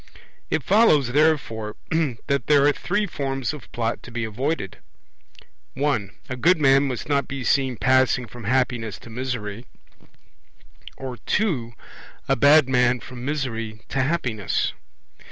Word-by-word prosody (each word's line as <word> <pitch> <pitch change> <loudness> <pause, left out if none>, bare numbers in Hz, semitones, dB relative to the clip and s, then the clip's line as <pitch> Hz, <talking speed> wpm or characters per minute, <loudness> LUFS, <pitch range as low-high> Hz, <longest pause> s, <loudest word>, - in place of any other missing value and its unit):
It 150 - 0
follows, 170 - +4
therefore, 135 -8 +1 0.5
that 140 -3 -1
there 145 -2 +5
are 145 - +4
three 205 +7 -1
forms 135 -6 -3
of 150 - -11
Plot 115 0 -2
to - - -11
be 120 -1 -4
avoided. 110 - -3 1.0
(1) 135 -8 0 0.2
A 130 - -4
good 165 +7 +3
man 135 -1 +4
must 125 -4 -4
not 140 -1 +1
be 140 -2 -5
seen 130 -2 +1
passing 130 +1 +3
from 120 -1 -11
happiness 120 -3 0
to 115 - -13
misery, 120 -2 -4 1.3
or 130 -2 -6
(2) 130 - -1 0.5
a - - +3
bad 145 +2 +6
man 125 -1 +3
from 125 0 -10
misery 115 -7 -3
to 135 - 0
happiness. 125 - -1
130 Hz, 135 wpm, -23 LUFS, 120-145 Hz, 1.3 s, bad